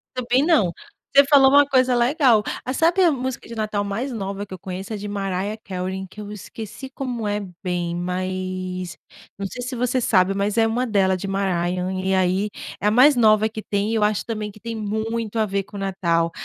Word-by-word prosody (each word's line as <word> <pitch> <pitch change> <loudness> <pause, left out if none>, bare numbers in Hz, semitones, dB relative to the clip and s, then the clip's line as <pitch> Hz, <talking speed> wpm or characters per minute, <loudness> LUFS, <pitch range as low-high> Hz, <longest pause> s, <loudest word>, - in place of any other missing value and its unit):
Também 255 +2 +2
não. 280 - +3 0.4
Você 280 - +8
falou 275 -1 +6
uma 285 +1 +6
coisa 255 -2 +3
legal. 240 -3 +4 0.2
Ah, 255 - -3
sabe 340 +6 +3
a 340 - +5
música 260 -2 -4
de 230 - -8
Natal 215 -2 -1
mais 215 +7 -3
nova 200 -2 -4
que 190 - -11
eu 185 - -8
conheço, 190 +3 -6
é - - -3
de 205 +1 -6
Mariah 200 +1 -2
Carey 190 0 -4
que 210 +3 -11
eu 205 0 -8
esqueci 220 +5 -8
como 245 -5 -4
é 205 0 0 0.2
bem, 175 -1 -2
mas 185 0 -3 0.4
não 200 - -3
sei 245 - -7
se 255 +1 -4
você 250 +1 0
sabe, 195 -4 +3
mas 200 +1 0
é 225 0 +4
uma 245 +3 0
dela, 190 -4 +2
de 195 - -5
Mariah 180 -2 0 0.2
e 190 - +1
aí, 190 +2 +1 0.3
é - - -4
a - - +4
mais 265 +5 +6
nova 215 -2 +4
que 215 0 -6
tem 205 +2 -1
e - - 0
eu 210 - +2
acho 210 -1 +1
também 215 -3 -4
que 215 - -17
tem 230 +1 -5
muito 220 +1 -2
a 220 - +3
ver 195 0 -1
com 205 - -11
o - - -5
Natal. 170 -4 0
210 Hz, 220 wpm, -22 LUFS, 190-240 Hz, 0.4 s, Você